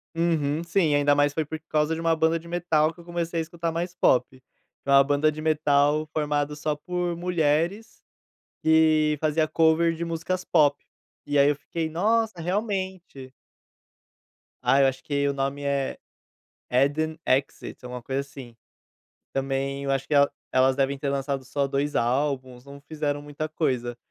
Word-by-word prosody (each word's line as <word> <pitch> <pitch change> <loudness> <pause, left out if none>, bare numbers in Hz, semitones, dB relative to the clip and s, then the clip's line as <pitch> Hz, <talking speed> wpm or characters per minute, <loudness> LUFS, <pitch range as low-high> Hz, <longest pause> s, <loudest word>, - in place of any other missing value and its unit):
Uhum 165 -2 0
sim, 165 -4 +2
ainda 145 0 +3
mais 145 0 +2
foi 160 -1 -1
por 160 +2 -6
causa 155 +1 +1
de 165 - -4
uma 165 -1 +2
banda 160 +1 +2
de 170 - -14
metal 165 -3 +1
que 175 - -20
eu 170 - -13
comecei 170 -1 -3
a - - +1
escutar 165 0 -4
mais 170 +2 -3
pop. 130 -5 +1 0.4
É - - -5
uma 140 0 +7
banda 145 +2 +2
de 155 - -9
metal 150 -1 +2
formado 150 -1 -1
só 150 0 -2
por 175 +2 -3
mulheres, 170 +4 -1 0.6
que 155 -1 +3
fazia 155 0 +1
cover 165 +1 +3
de 170 +1 -4
músicas 165 +2 -3
pop. 145 -4 +3 0.4
E 145 0 0
aí 140 +1 +6
eu 145 - +1
fiquei 160 +2 -4
nossa, 215 +3 0
realmente. 185 - -3 1.3
Ah, 140 +1 +4
eu 135 - +5
acho 130 0 -3
que 140 -1 0
o - - +2
nome 140 +1 -3
é 140 -1 -1 0.7
Addon 145 +5 +1
Exit, 135 0 -1
é - - -7
uma 125 -1 -7
coisa 135 +1 -2
assim. 135 -4 -11 0.8
Também 135 +1 -2
eu 135 - -2
acho 135 0 -1
que 150 - 0
elas 140 0 +6 0.2
elas 130 0 +4
devem 135 0 0
ter 140 - -3
lançado 135 -1 -2
só 140 +1 -1
dois 140 +2 -1
álbuns, 130 0 -1
não 140 0 -12
fizeram 145 -1 -3
muita 145 +1 -5
coisa, 125 -6 -2
150 Hz, 170 wpm, -25 LUFS, 140-165 Hz, 1.3 s, uma